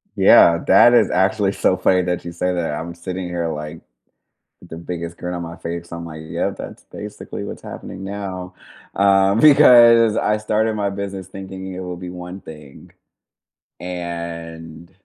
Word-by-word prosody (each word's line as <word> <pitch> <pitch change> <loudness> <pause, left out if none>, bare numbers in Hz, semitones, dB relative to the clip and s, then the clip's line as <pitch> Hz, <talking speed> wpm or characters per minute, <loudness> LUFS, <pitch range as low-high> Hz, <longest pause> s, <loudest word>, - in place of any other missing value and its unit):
Yeah. 85 0 +6
That 120 +5 +6
is - - +4
actually 95 +1 +1
so 95 - +1
funny 90 0 +2
that 90 -1 -3
you 85 - -5
say 90 +1 -2
that. 85 -4 -2
I'm 85 +3 -5
sitting 90 +1 -5
here, 85 -1 -3
like, 75 0 -7 0.8
with 90 - -17
the 80 - -8
biggest 85 0 -6
grin 90 0 -5
on 85 -1 -4
my 85 0 -8
face. 85 +1 -6
I'm 85 0 -6
like, 80 -1 -9
"Yeah, 80 - -2
that's - - -10
basically - - -8
what's - - -8
happening 95 - -9
now." 95 -2 -6 0.4
Um, 100 +1 +3
because 120 -6 +7
I 105 0 +1
started 110 +1 0
my 100 -1 -1
business 100 -1 -6
thinking 95 0 -8
it 90 - -7
will 90 -1 -6
be 90 0 -8
one 90 +1 -8
thing. 75 -3 -13 0.9
And 85 -2 -7
90 Hz, 165 wpm, -20 LUFS, 85-100 Hz, 0.9 s, because